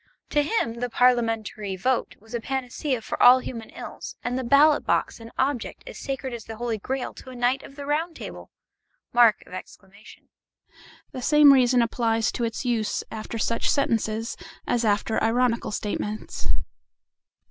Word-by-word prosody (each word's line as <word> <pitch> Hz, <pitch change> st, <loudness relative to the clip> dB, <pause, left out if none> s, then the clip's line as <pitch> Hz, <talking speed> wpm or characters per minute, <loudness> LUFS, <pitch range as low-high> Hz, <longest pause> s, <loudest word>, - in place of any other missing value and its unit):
To 295 Hz, -, +3 dB
him 285 Hz, -, -1 dB
the 245 Hz, 0 st, -2 dB
parliamentary 225 Hz, -5 st, +1 dB
vote 250 Hz, +7 st, 0 dB
was 220 Hz, +3 st, -16 dB
a 235 Hz, -, -1 dB
panacea 260 Hz, 0 st, -2 dB
for -, -, -4 dB
all 245 Hz, +1 st, +9 dB
human 230 Hz, -3 st, -6 dB
ills, -, -, -8 dB
and 245 Hz, -, -1 dB
the 260 Hz, -, -1 dB
ballot 285 Hz, +5 st, +5 dB
box -, -, 0 dB
an 230 Hz, 0 st, -10 dB
object 265 Hz, -2 st, -1 dB
as -, -, -9 dB
sacred 265 Hz, -2 st, -4 dB
as 230 Hz, -2 st, -7 dB
the 225 Hz, -, -7 dB
Holy 230 Hz, -1 st, -2 dB
Grail 260 Hz, +5 st, -3 dB
to -, -, -12 dB
a 255 Hz, -, -9 dB
knight 245 Hz, +2 st, +1 dB
of 275 Hz, -, -13 dB
the 285 Hz, -1 st, -7 dB
Round 320 Hz, +4 st, -1 dB
Table! -, -, -9 dB, 0.6 s
The 225 Hz, -6 st, +3 dB, 1.6 s
same 300 Hz, +1 st, +7 dB
reason 250 Hz, -2 st, +4 dB
applies 225 Hz, -1 st, +1 dB
to 240 Hz, -, -3 dB
its 230 Hz, +3 st, -3 dB
use 225 Hz, -4 st, 0 dB
after 220 Hz, +1 st, -5 dB
such 230 Hz, +1 st, 0 dB
sentences 225 Hz, -4 st, 0 dB, 0.3 s
as 240 Hz, -1 st, 0 dB
after 215 Hz, +1 st, +1 dB
ironical 235 Hz, +1 st, +1 dB
statements. 210 Hz, -, -4 dB
240 Hz, 155 wpm, -25 LUFS, 225-260 Hz, 1.6 s, all